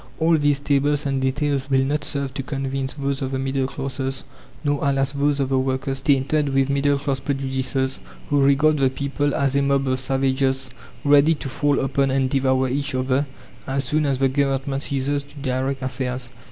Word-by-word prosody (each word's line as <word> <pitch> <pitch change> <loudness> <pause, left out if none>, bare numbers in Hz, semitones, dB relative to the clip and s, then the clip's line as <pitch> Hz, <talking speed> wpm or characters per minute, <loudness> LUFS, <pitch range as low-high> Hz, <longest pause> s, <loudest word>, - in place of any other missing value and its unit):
All 165 +1 +3
these 145 -2 +2
tables 145 +1 +1
and 135 -1 0
details 140 +1 0
will 135 -1 +3
not 150 +2 -1
serve 140 -2 -3
to 135 - -3
convince 135 0 -3
those 140 -1 -2
of 135 - -1
the 135 - -2
middle 135 0 -1
classes, 135 -1 -4 0.4
nor, 145 -1 +1
alas, 135 -1 +1
those 140 0 +1
of 135 -1 0
the 135 -1 +2
workers 130 0 -1
tainted 140 +1 +2
with 135 0 +1
middle 140 0 +2
class 140 -1 -2
prejudices, 135 -1 -1 0.3
who 145 -1 +4
regard 145 +2 +4
the 135 -1 +4
people 140 +1 -1
as 140 -1 +1
a 140 - +3
mob 140 0 +1
of 130 0 0
savages 135 0 0 0.3
ready 145 +2 +5
to 145 - -6
fall 145 +1 +1
upon 135 +1 +1
and 130 -1 +1
devour 130 -1 +2
each 140 +2 -2
other, 130 +2 +1 0.4
as 135 +1 -1
soon 150 +3 0
as 135 -2 +1
the 135 +1 +3
Government 135 0 0
ceases 140 0 0
to 145 +1 -18
direct 135 0 -2
affairs. 125 -1 -3
135 Hz, 190 wpm, -22 LUFS, 130-140 Hz, 0.4 s, ready